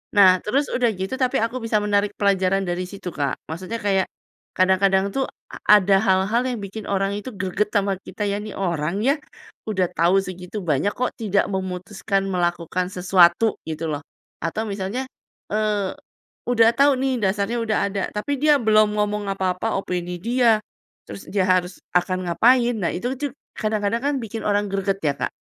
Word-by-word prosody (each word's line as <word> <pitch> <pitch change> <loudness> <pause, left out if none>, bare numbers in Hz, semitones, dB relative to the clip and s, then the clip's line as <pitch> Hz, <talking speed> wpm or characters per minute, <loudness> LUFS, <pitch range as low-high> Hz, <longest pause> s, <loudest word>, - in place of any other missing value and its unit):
Nah, 185 -2 +7
terus 275 +7 +1
udah 245 -2 +2
gitu 190 +5 -4
tapi 255 -1 +1
aku 230 +2 -2
bisa 220 -2 +1
menarik 205 0 +1
pelajaran 195 -1 +2
dari 175 +1 -1
situ 195 -3 -7
Kak, 140 -2 -1
maksudnya 185 +8 -5
kayak 195 -2 +1 0.5
kadang-kadang 190 +1 +3
tuh 270 -1 -1 0.2
a - - -6 0.2
ada 195 +1 +3
hal-hal 195 +3 +2
yang 245 - -3
bikin 200 +2 -7
orang 195 0 0
itu 210 +5 -5
greget 200 +1 -1
sama 200 -2 +1
kita 210 - -5
ya, 200 +1 -1
"Ini 215 -1 -7
orang 170 0 -1
ya, 280 +2 +4 0.5
udah 185 -4 +1
tahu 170 +4 +3
segitu 185 +2 -6
banyak 155 +7 +1
kok 250 0 -1
tidak 205 -3 +1
memutuskan 190 +1 -2
melakukan 175 0 -1
sesuatu." 180 +3 +3
gitu 160 +1 -4
loh. 145 +1 -3 0.4
Atau 215 +7 -2
misalnya, 200 +5 -3 0.5
eee, 210 -3 0 0.6
udah 230 -2 +5
tahu 280 +2 +4
nih, 265 0 0
dasarnya 200 +4 0
udah 220 -2 0
ada, 195 -1 -2
tapi 275 +6 -2
dia 300 -1 +5
belum 215 -3 +3
ngomong 210 -1 -1
apa-apa 190 +2 -1
opini 180 -2 -3
dia, 235 +2 +3 0.5
terus - - -10
dia 195 -2 +1
harus 185 0 +1 0.2
akan 185 +1 +1
ngapain, 245 +5 +4
nah 170 - +1
itu 245 +8 -2
tuh 290 -2 -2 0.3
kadang-kadang 215 +1 0
kan 285 +1 0
bikin 220 0 -5
orang 205 0 +2
greget 195 0 0
ya 145 -2 +2
Kak. - - -1
200 Hz, 170 wpm, -22 LUFS, 185-220 Hz, 0.6 s, Nah